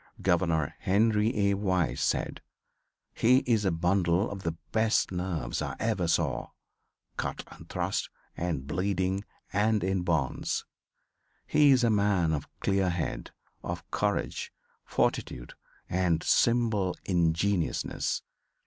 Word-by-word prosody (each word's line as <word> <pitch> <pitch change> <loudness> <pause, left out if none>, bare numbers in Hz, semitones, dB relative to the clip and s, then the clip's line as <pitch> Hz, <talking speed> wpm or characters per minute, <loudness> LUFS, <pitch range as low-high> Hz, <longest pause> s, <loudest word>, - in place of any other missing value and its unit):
Governor 85 -5 +1
Henry 105 +1 +2
A. - - +3
Wise 90 -9 0
said: 80 - -1 0.7
"He 125 +3 +4
is 110 -4 +2
a 95 - +3
bundle 90 +3 +1
of 100 -1 -6
the 85 -2 -2 0.2
best 110 -2 +2
nerves 90 -8 -2
I - - -3
ever 110 -6 0
saw, 80 -6 0 0.7
cut - - -3
and - - -13
thrust; - - -2 0.3
and 85 -6 -2
bleeding 95 +4 -1 0.3
and 105 0 +2
in 95 0 0
bonds. 80 -5 -1 0.8
He 150 -1 +4
is 130 -2 +5
a 115 - +4
man 100 -6 +2
of 75 - -3
clear 95 -2 +2
head, 85 -2 -3 0.3
of - - -5
courage, - - -1 0.3
fortitude - - -1 0.3
and 90 -3 +1
simple 115 -6 +2
ingenuousness. 85 +1 0
95 Hz, 120 wpm, -29 LUFS, 85-105 Hz, 0.8 s, is